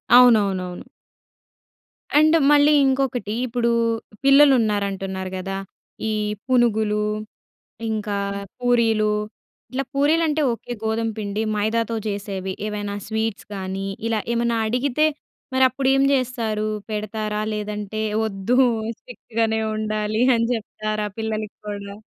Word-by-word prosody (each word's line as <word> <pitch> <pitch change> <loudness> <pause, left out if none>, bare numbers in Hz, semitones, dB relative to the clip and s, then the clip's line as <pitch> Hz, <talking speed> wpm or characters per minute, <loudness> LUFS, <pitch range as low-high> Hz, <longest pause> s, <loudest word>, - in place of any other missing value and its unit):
అవునవునవును. 200 -7 +4 1.3
అండ్ 310 +2 +6 0.2
మళ్ళీ 295 0 +6
ఇంకొకటి 260 -5 0
ఇప్పుడు 235 -1 0 0.5
పిల్లలున్నారంటున్నారు 205 -9 +3
గదా! 195 +1 -4 0.5
ఈ - - 0 0.3
పునుగులు, 220 -4 +2 0.9
ఇంకా 210 -2 -2 0.4
పూరీలు 225 -3 +2 0.6
ఇట్లా 265 +2 -1
పూరీలుంటే 310 +2 +2
ఓకే. 230 +1 -6
గోధుమ 225 +1 0
పిండి. 205 0 -2
మైదాతో 225 +2 0
చేసేవి, 195 -2 -3
ఏవైనా 205 -1 -4
స్వీట్స్ 220 -1 -2
గానీ 190 0 -4 0.2
ఇలా 225 -1 +1
ఏమన్నా 235 0 +1
అడిగితే 255 +5 +1 0.5
మరి 260 0 +4
అప్పుడు 260 +1 -2
ఏం 270 - +3
జేస్తారు? 230 -5 -1 0.2
పెడతారా! 215 0 -3
లేదంటే 210 0 -4 0.2
వద్దు 210 +3 0 0.4
స్ట్రిక్ట్‌గానే 225 -2 -2
ఉండాలి 215 0 -1
అని 230 0 +1
చెప్తారా? 215 -1 -3
పిల్లలకి 215 -1 -3
గూడా. 200 -1 -6
220 Hz, 100 wpm, -22 LUFS, 210-245 Hz, 1.3 s, అండ్